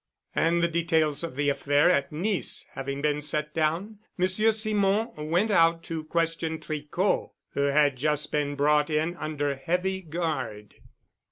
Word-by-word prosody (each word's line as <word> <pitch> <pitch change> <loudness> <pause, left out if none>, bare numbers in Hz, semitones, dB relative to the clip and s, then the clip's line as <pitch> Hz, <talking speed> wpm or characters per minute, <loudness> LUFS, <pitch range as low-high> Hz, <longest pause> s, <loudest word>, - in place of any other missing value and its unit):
And 170 +1 +2
the - - +4
details 160 -3 +1
of 165 -6 -5
the 145 +1 +1
affair 145 +4 +3
at 140 -5 +1
Nice 185 +6 0
having 140 +1 -5
been 150 0 +1
set 150 0 -1
down, 165 +7 -1 0.2
Monsieur 185 +4 +2
Simon 215 0 +1 0.2
went 185 +7 +2
out 165 -2 +4
to 160 -1 -5
question 165 0 -1
Tricot, 155 +5 -1 0.2
who - - -1
had 140 -1 +3
just 150 +2 0
been 145 -1 -1
brought 150 +1 +3
in 160 +3 0
under 145 -3 -2
heavy 180 +7 -1
guard. 150 - -4
155 Hz, 150 wpm, -27 LUFS, 145-175 Hz, 0.2 s, the